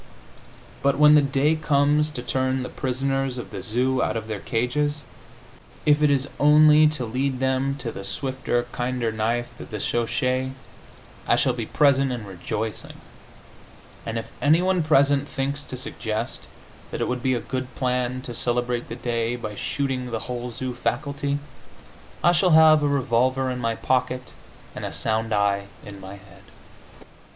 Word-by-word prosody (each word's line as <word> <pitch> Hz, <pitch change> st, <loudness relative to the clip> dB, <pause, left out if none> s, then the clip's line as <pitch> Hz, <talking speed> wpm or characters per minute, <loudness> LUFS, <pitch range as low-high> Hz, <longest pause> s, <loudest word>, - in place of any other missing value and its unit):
But 140 Hz, 0 st, +2 dB
when 150 Hz, 0 st, +7 dB
the 150 Hz, -, +7 dB
day 140 Hz, +2 st, +2 dB
comes 150 Hz, 0 st, +2 dB
to 125 Hz, -5 st, -6 dB
turn 130 Hz, +1 st, 0 dB
the -, -, -5 dB
prisoners 135 Hz, 0 st, -1 dB
of 120 Hz, -, -7 dB
the 100 Hz, -2 st, -6 dB
zoo 125 Hz, +5 st, +1 dB
out 110 Hz, -, 0 dB
of 110 Hz, -1 st, -5 dB
their 110 Hz, -2 st, -4 dB
cages, 145 Hz, +7 st, -1 dB, 0.8 s
if 150 Hz, 0 st, +4 dB
it 150 Hz, -, +5 dB
is 140 Hz, -1 st, +1 dB
only 150 Hz, +1 st, +7 dB
to 150 Hz, -5 st, -2 dB
lead 130 Hz, +3 st, -1 dB
them 130 Hz, +1 st, 0 dB
to 140 Hz, -, -5 dB
the 95 Hz, -, -8 dB
swifter, 125 Hz, +3 st, -2 dB
kinder 125 Hz, -2 st, -1 dB
knife 115 Hz, +2 st, -2 dB
of -, -, -9 dB
the 105 Hz, -, -5 dB
schochet, 130 Hz, +4 st, -1 dB, 0.7 s
I -, -, +4 dB
shall 130 Hz, -, +2 dB
be 115 Hz, -3 st, -4 dB
present 140 Hz, -2 st, +3 dB
and 120 Hz, -4 st, -5 dB
rejoicing, 105 Hz, +4 st, -5 dB, 1.1 s
and 115 Hz, 0 st, -4 dB
if 115 Hz, -, -6 dB
any 155 Hz, +3 st, +5 dB
one 185 Hz, -1 st, +2 dB
present 145 Hz, -2 st, +3 dB
thinks 140 Hz, +2 st, -2 dB
to 130 Hz, -, -6 dB
suggest 110 Hz, -3 st, -4 dB, 0.4 s
that -, -, -5 dB
it -, -, 0 dB
would 125 Hz, 0 st, -2 dB
be 130 Hz, 0 st, +1 dB
a -, -, -1 dB
good 130 Hz, 0 st, -5 dB
plan 125 Hz, -1 st, -1 dB
to 120 Hz, -, -6 dB
celebrate 120 Hz, 0 st, -1 dB
the 115 Hz, -, -5 dB
day 120 Hz, -1 st, -1 dB
by 110 Hz, -3 st, -6 dB
shooting 130 Hz, +3 st, -2 dB
the 115 Hz, -2 st, -3 dB
whole 125 Hz, 0 st, -5 dB
zoo 125 Hz, +2 st, -5 dB
faculty, 140 Hz, +3 st, -2 dB, 0.9 s
I 175 Hz, -, +6 dB
shall 175 Hz, -1 st, +4 dB
have 155 Hz, -1 st, +7 dB
a 145 Hz, -, +2 dB
revolver 130 Hz, -1 st, +1 dB
in 125 Hz, -, -4 dB
my 115 Hz, -1 st, -1 dB
pocket 125 Hz, +1 st, -1 dB, 0.4 s
and -, -, -6 dB
a -, -, -3 dB
sound 110 Hz, +1 st, -1 dB
eye 100 Hz, -1 st, +1 dB, 0.2 s
in 100 Hz, -1 st, -9 dB
my 95 Hz, +1 st, -9 dB
head. 100 Hz, -2 st, -17 dB
130 Hz, 170 wpm, -24 LUFS, 120-140 Hz, 1.1 s, when